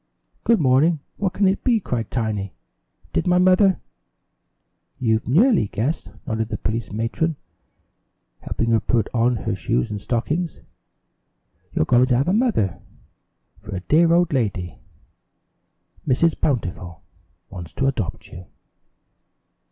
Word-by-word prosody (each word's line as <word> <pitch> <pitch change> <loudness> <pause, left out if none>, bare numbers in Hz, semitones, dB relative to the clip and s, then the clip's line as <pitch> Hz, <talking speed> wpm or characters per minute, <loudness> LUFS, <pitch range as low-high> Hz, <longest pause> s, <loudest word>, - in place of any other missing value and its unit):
"Good 230 -3 +3
morning. 145 +3 +3 0.2
What 195 -2 -1
can 200 +1 +2
it 190 +1 0
be?" 240 -4 +3
cried 120 - -3
Tiny. 105 -5 -3 0.6
"Did - - 0
my 180 0 +4
mother 185 +1 +4 0.6
?" - - -50
"You've 110 -3 +1
nearly 180 - +4
guessed," 130 +11 -2 0.2
nodded 110 -4 -2
the 105 - -3
police 110 -1 -3
matron, 115 +10 -1 1.0
helping 115 0 -2
her 115 - +4
put 110 0 0
on 120 +1 +2
her 110 -2 -2
shoes 75 - -1
and 105 -1 -4
stockings. 150 - -2 1.1
"You're 80 - +1
going 125 +6 +4
to 125 -2 +3
have 135 - +1
a 180 - +2
mother, 210 - +1 0.8
for 105 0 -7
a 90 - -4
dear 165 - +3
old 170 -2 +3
lady 100 - -2 1.3
Mrs. 155 +5 +3
Bountiful 90 - -2 0.5
wants 90 -4 -8
to 135 - -1
adopt 120 -10 -2
you." 90 -1 -11
125 Hz, 135 wpm, -22 LUFS, 105-170 Hz, 1.3 s, my